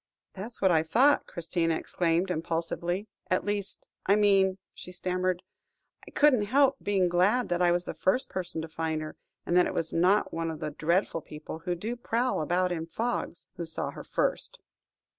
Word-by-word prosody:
"That 195 +1 -6
was 235 0 -10
what 190 - +5
I 160 -2 +4
thought," 245 - +3
Christina 165 -1 -1
exclaimed 175 +3 0
impulsively; 170 +4 -2 0.2
"at - - +1
least 205 -1 -3 0.2
I 200 - +5
mean," 195 -2 +4 0.2
she 180 - -10
stammered, 180 0 -1 0.6
"I - - -8
couldn't 265 -8 +4
help 270 +5 +3
being 195 -3 +2
glad 190 +8 +2
that 175 0 0
I 175 -1 +5
was 175 +1 0
the - - -4
first 250 +8 +1
person 175 -3 -4
to - - -5
find 160 -1 -2
her, 155 - -7 0.3
and 175 - 0
that 180 - +5
it - - -5
was 165 - -1
not 185 +5 +3
one 165 0 -2
of 160 -2 -5
the 150 - -3
dreadful 165 +3 0
people 155 +1 -8
who 175 +2 -2
do 220 +8 -4
prowl 240 -3 0
about 180 +4 +1
in 165 -2 -3
fogs, 225 -2 -3
who 170 - -3
saw 160 - -2
her - - -9
first." - - -1
180 Hz, 190 wpm, -28 LUFS, 165-205 Hz, 0.6 s, what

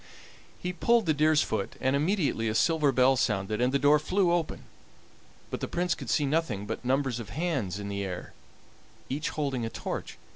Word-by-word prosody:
He 180 0 -4
pulled 230 +5 +3
the 160 - +3
deer's 155 +1 +3
foot, 100 -3 -3
and 130 +1 +1
immediately 150 - +1
a 110 - -1
silver 155 +1 +3
bell 130 +1 +4
sounded 105 -2 0
and 125 +1 +3
the 140 - +3
door 145 +2 +5
flew 185 +3 +1
open, 170 -2 -1 0.9
but - - -3
the - - -3
Prince 180 0 0
could - - -7
see 150 - +2
nothing 135 -9 -1
but - - -5
numbers 130 -1 0
of 115 - -7
hands 140 - -2
in 100 -1 -5
the 100 0 -3
air, 90 -2 -6 0.8
each 145 +4 -2
holding 140 -5 -2
a 115 - -2
torch. - - -5
140 Hz, 190 wpm, -28 LUFS, 115-160 Hz, 0.9 s, door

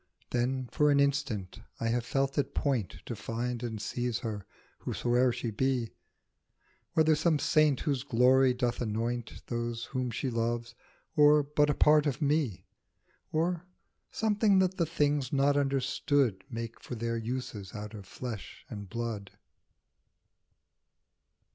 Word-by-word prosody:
Then 125 +1 0
for 150 -1 +3
an 140 -1 +4
instant 140 -9 0 0.2
I 115 - 0
have 120 +1 +1
felt 135 +3 0
at 145 - -2
point 115 - 0
To 120 - -4
find 115 +3 -3
and 115 -3 -4
seize 120 +2 -2
her, 105 -4 -5 0.3
whosoe'er 125 +1 +1
she 120 -1 -3
be, 125 0 0 1.0
Whether 160 0 +4
some 155 +1 +2
saint 150 -3 +3
whose 140 -4 0
glory 130 0 +4
doth 125 -1 -1
anoint 115 +1 -3
Those 120 0 -3
whom 130 -2 -2
she 125 +3 -2
loves, 115 0 -1 0.4
or 150 0 +6
but 150 +1 +2
a 145 - +2
part 150 0 +5
of 135 -2 -1
me, 145 - 0 0.7
Or 170 +2 0 0.4
something 210 -2 +2
that 190 0 +2
the 170 -4 +1
things 145 -4 +1
not 140 0 +3
understood 135 -6 +1
Make 115 -1 -5
for 125 - -7
their 115 0 -2
uses 115 -4 -4
out 105 +1 -6
of 100 -3 -9
flesh 115 -4 -7
and 100 -2 -7
blood. 115 -3 -4
125 Hz, 140 wpm, -30 LUFS, 115-145 Hz, 1.0 s, or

